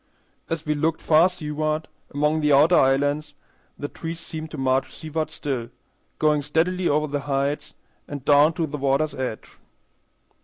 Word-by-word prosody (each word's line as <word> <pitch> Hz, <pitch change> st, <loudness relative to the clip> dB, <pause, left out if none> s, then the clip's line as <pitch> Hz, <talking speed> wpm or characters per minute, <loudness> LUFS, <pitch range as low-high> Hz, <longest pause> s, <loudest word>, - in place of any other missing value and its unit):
As 165 Hz, -2 st, -3 dB
we 150 Hz, -, +1 dB
looked 160 Hz, +2 st, 0 dB
far 165 Hz, +3 st, +5 dB
seaward 155 Hz, -2 st, -2 dB, 0.2 s
among 150 Hz, +2 st, +1 dB
the 150 Hz, 0 st, +2 dB
outer 150 Hz, +5 st, +6 dB
islands, 145 Hz, +2 st, +2 dB, 0.4 s
the 145 Hz, -, -4 dB
trees 165 Hz, +2 st, -6 dB
seemed 160 Hz, -1 st, -6 dB
to 155 Hz, -, -8 dB
march 130 Hz, 0 st, +1 dB
seaward 160 Hz, 0 st, -4 dB
still, 135 Hz, -6 st, -4 dB, 0.5 s
going 150 Hz, -1 st, +2 dB
steadily 170 Hz, +5 st, 0 dB
over 150 Hz, +1 st, +2 dB
the 145 Hz, -1 st, -2 dB
heights 140 Hz, +2 st, -1 dB, 0.3 s
and 145 Hz, -2 st, -7 dB
down 145 Hz, +2 st, +5 dB
to 165 Hz, 0 st, -1 dB
the 150 Hz, -1 st, -6 dB
water's 140 Hz, +3 st, +1 dB
edge. 125 Hz, -5 st, -6 dB
150 Hz, 155 wpm, -24 LUFS, 145-160 Hz, 0.5 s, outer